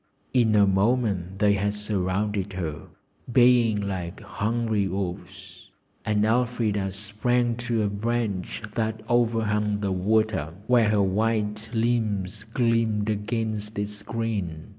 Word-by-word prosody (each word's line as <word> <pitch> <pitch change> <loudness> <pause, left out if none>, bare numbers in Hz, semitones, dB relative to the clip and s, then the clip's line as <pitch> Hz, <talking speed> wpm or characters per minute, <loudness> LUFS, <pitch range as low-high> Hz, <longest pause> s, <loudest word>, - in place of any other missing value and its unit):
In 115 -4 +3
a 100 -1 +6
moment 100 -2 +1
they 100 0 +4
had 100 +1 0
surrounded 100 -1 -1
her, 80 -5 -5 0.4
baying 120 -3 +5
like 90 -1 -4
hungry 110 -2 -1
wolves, 95 -1 -6 0.3
and 105 -1 +1
Elfrida 110 -4 +1
sprang 115 +5 0
to 120 -2 -1
a - - +1
branch 105 -1 -2
that 110 -1 -2
overhung 110 -3 +1
the 100 -2 -1
water, 95 -4 +1
where 120 -2 +4
her 105 -1 +3
white 105 +2 0
limbs 110 -3 0
gleamed 115 -3 +1
against 110 0 -3
its 105 0 -3
green. 105 -9 -3
105 Hz, 120 wpm, -25 LUFS, 100-115 Hz, 0.4 s, a